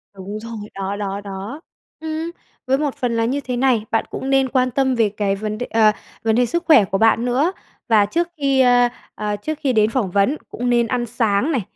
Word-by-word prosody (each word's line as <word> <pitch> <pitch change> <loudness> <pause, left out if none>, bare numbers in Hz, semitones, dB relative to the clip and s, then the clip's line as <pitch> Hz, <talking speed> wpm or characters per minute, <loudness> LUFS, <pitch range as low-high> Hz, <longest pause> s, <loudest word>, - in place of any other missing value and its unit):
Đúng 200 +2 -6
rồi, 230 +1 -7 0.2
đó, 195 +1 -3
đó, 200 -1 -4
đó. 200 +10 -7 0.4
Ừm, 320 +1 -4 0.4
với 265 +1 +3
một 290 -2 -2
phần 245 -2 -1
là 230 - +2
như 265 +5 0
thế 250 -2 -3
này, 245 -4 +2
bạn 225 - +1
cũng 265 - -5
nên 270 -1 +3
quan 255 -1 +1
tâm 265 0 +1
về 225 -3 +2
cái 200 -1 -1
vấn 215 +1 -4
đ 245 - -3
ờ, 220 -1 +4 0.3
vấn 220 0 +2
đề 245 - +3
sức 340 +8 -2
khỏe 275 - +6
của 195 - -1
bạn 225 +2 +3
nữa, 265 +8 +1 0.4
và 215 -3 +5
trước 340 +11 -1
khi, 275 -2 +2
ơ, 245 -1 +5 0.3
ờ, 210 -1 -2
trước 305 +9 -4
khi 265 -4 +1
đến 215 -1 +3
phỏng 225 -6 -1
vấn 205 +10 +2
cũng 245 0 -3
nên 235 -1 +3
ăn 245 0 -1
sáng 230 +3 0
này. 260 -7 +1
240 Hz, 230 wpm, -20 LUFS, 210-265 Hz, 0.4 s, khỏe